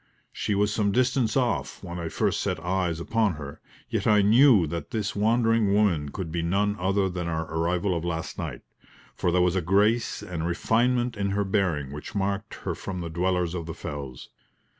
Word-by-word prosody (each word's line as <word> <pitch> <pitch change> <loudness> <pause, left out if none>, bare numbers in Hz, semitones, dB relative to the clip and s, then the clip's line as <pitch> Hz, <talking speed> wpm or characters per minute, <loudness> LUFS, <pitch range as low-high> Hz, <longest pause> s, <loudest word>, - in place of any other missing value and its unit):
She 105 - -1
was 105 +1 +1
some 105 -2 +1
distance 125 0 +1
off 125 -5 -1
when 90 -1 -6
I 85 -1 -3
first - - 0
set - - -1
eyes 90 -1 -1
upon 110 +2 +1
her, 70 -2 -9 0.3
yet - - -1
I 105 -2 +5
knew 115 - +6
that 80 -1 -5
this 105 -3 -2
wandering 115 -1 +2
woman 85 -9 +2
could 80 +2 -5
be 85 0 -1
none 100 +5 +1
other 95 +1 +1
than 90 -2 -4
our 80 -1 -2
arrival 90 +3 0
of 85 - -2
last 80 -1 -3
night, - - -5 0.5
for 90 - 0
there 90 0 +3
was 90 0 +2
a 95 - +1
grace 105 +6 +2
and 85 -4 -3
refinement 120 +7 +1
in 100 -1 0
her 100 +1 0
bearing 90 -9 0
which 75 +7 -8
marked 100 0 -2
her - - 0
from 90 -2 -5
the 85 - -4
dwellers 90 0 0
of 85 -3 -4
the 80 - -5
fells. 70 -4 -7
95 Hz, 195 wpm, -26 LUFS, 85-105 Hz, 0.5 s, knew